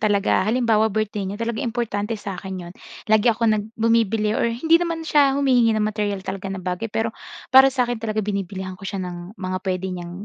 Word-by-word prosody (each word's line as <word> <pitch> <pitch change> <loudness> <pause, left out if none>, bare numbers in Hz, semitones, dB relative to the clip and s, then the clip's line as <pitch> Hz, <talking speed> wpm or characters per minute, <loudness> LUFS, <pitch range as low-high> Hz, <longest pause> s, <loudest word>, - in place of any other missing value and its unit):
talaga. 205 -3 +2
Halimbawa, 225 -2 +3
birthday 210 -2 -2
niya, 200 - -5
talagang 230 +2 -2
importante 225 -2 -2
sa 200 -1 -6
akin 190 -2 -6
'yon. 175 - -10 0.4
Lagi 220 +2 +5
ako 230 +1 +1
nag 215 -2 +2
bumibili 225 -2 +2
or 235 - +1
hindi 320 +9 +3
naman 335 -2 -2
siya 280 -3 +3
humihingi 245 -5 +3
ng 215 - +1
materyal 205 -2 -2
talaga 195 0 -5
na 195 - -4
bagay, 180 +5 -2
pero 225 +1 -2 0.4
para 265 +1 +9
sa 255 -2 +1
akin 240 -2 -3
talaga 215 -2 -2
binibilihan 190 -2 -4
ko 190 +1 -8
siya 195 -2 -3
ng 175 +4 -8
mga 185 -1 -3
puwede 185 0 -1
niyang 175 +2 -7
215 Hz, 205 wpm, -22 LUFS, 195-230 Hz, 0.4 s, para